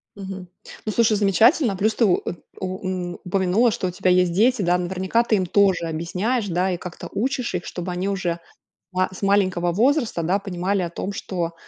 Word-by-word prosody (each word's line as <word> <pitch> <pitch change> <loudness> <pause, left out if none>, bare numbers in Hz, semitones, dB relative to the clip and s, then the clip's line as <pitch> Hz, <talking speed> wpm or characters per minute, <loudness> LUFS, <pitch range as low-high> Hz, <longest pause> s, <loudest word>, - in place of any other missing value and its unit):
Мгм. 190 -2 -7 0.4
Ну, 215 - -1
слушай, 220 -2 +3
замечательно, 220 - +4
плюс 215 +4 +1
ты 230 - +3
у 180 - +4
у - - -3
э, - - -3 0.3
ун 185 -1 -3
упомянула, 190 +5 +2
что 185 - -2
у - - -3
тебя 185 +1 0
есть 180 -1 +3
дети, 230 +6 +3
да. 180 -1 +2
Наверняка 190 +6 0
ты 225 - +2
им 185 -2 +1
тоже 190 -2 +2
объясняешь, 185 +8 -1
да, 180 +2 0
и 175 - -1
как-то 180 -1 -8
учишь 250 -1 -1
их, 180 - -3
чтобы 180 0 -5
они 180 +2 -2
уже 180 -4 -1 0.5
ма 185 0 +1
с - - -10
маленького 185 -3 +2
возраста, 235 - +1
да, 185 +5 +2
понимали 195 0 -1
о 175 - -2
том, 195 +4 -5
что, 170 -4 -3
190 Hz, 200 wpm, -23 LUFS, 180-205 Hz, 0.5 s, замечательно